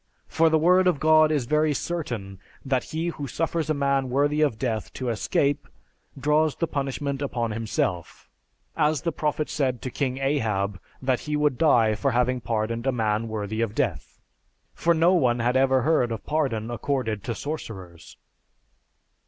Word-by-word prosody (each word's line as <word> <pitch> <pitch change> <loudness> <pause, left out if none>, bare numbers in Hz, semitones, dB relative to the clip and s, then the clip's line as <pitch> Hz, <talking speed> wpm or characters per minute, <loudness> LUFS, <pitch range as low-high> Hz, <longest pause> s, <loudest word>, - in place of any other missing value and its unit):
For 165 0 +3
the 160 - +3
word 180 +4 +4
of 170 -6 +2
God 155 0 +5
is 145 -5 0
very 150 +2 +2
certain 120 - -4 0.3
that 130 -2 0
he 165 +2 -3
who 145 -4 -5
suffers 165 +3 -2
a 155 - +2
man 140 -2 +1
worthy 145 +4 +1
of 140 -8 +2
death 110 -3 -2
to 130 -2 -3
escape, 140 +5 0 0.5
draws 150 +2 +2
the 165 - 0
punishment 140 -1 -3
upon 120 -5 -2
himself, 110 - -3 0.5
as 155 -1 +1
the 170 - 0
prophet 150 0 -1
said 130 -5 -1
to 130 - -4
King 130 -1 -2
Ahab, 110 -9 -1 0.2
that 130 -1 +1
he 150 - 0
would 150 -3 +1
die 120 -9 +4
for 125 +6 0
having 125 +1 +1
pardoned 115 +2 -2
a - - +4
man 110 -2 0
worthy 110 0 -3
of 110 -2 -2
death. - - -2 0.5
For 170 0 +2
no 170 +3 +4
one 125 -9 +3
had 120 +1 0
ever 130 -1 +3
heard 130 -6 +2
of 115 - -5
pardon 125 -8 -1
accorded 120 -4 -2
to 115 - -2
sorcerers." 95 - -7
135 Hz, 170 wpm, -25 LUFS, 115-150 Hz, 0.5 s, God